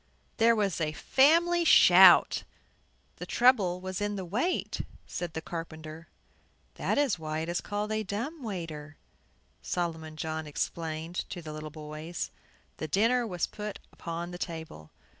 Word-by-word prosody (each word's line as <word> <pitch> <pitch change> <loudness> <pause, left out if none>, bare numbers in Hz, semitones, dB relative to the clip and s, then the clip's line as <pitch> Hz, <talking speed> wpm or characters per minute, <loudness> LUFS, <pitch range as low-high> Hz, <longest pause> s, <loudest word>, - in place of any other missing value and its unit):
There 230 0 +5
was 200 -5 0
a 155 -1 0
family 335 - +4
shout. - - +7 0.7
"The - - -7
trouble 215 -8 +3
was 185 +1 -4
in 205 0 -1
the 190 -2 -4
weight," 245 - -1 0.2
said 175 -2 -5
the 160 - -4
carpenter. 160 -1 -7 0.7
"That - - -1
is 275 - +2
why 155 0 -3
it 165 - -4
is 175 - -1
called 210 +1 -3
a 215 0 0
dumb 230 - -4
waiter," 165 - -6 0.6
Solomon 160 - -3
John 160 0 -4
explained 160 +3 -4
to 175 - -6
the 155 -1 -7
little 155 0 -6
boys. 155 +2 -6 0.5
The 155 - -4
dinner 230 - +2
was 180 -4 -1
put 210 -1 -6 0.2
upon 170 +1 -5
the 175 - -8
table. 160 - -6
175 Hz, 145 wpm, -29 LUFS, 160-210 Hz, 0.7 s, shout